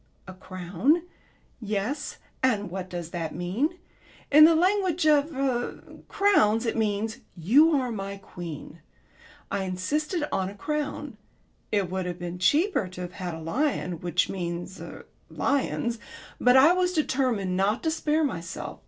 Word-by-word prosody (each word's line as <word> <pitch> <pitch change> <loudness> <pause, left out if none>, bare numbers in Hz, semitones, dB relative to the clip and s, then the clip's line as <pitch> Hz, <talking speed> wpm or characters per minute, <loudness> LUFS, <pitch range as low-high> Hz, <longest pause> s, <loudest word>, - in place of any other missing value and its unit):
"A 185 - -8
crown." 185 - 0 0.6
"Yes. 215 +5 -3 0.2
And 210 -7 +1
what 185 0 -5
does 175 -2 -6
that 165 -4 -4
mean? 215 - -1 0.5
In 305 +2 +9
the 330 +1 +6
language 365 -1 +2
of 300 0 +4
er 260 -3 -1 0.3
crowns 235 - +3
it 225 - -1
means 220 0 -1 0.2
'You 250 - +5
are 250 -2 -2
my 200 -2 -5
queen.' 170 -4 -9 0.7
I 200 -1 -1
insisted 295 - -1
on 190 0 0
a 200 - -10
crown. 295 -1 -3 0.5
It 195 -4 0
would 185 -1 -2
have 175 -1 -4
been 175 0 -6
cheaper 290 - +2
to 180 0 -9
have 180 0 -6
had 180 -3 -5
a - - -7
lion, 180 - -1
which 175 +1 +1
means 175 0 -5
er - - -9 0.2
lions, 235 -4 -1 0.4
but 250 +1 +5
I 295 +6 +7
was 365 0 +1
determined 255 - 0
not 200 +4 +1
to 320 - +1
spare 315 0 +1
myself. 170 - -4
215 Hz, 150 wpm, -26 LUFS, 180-295 Hz, 0.7 s, In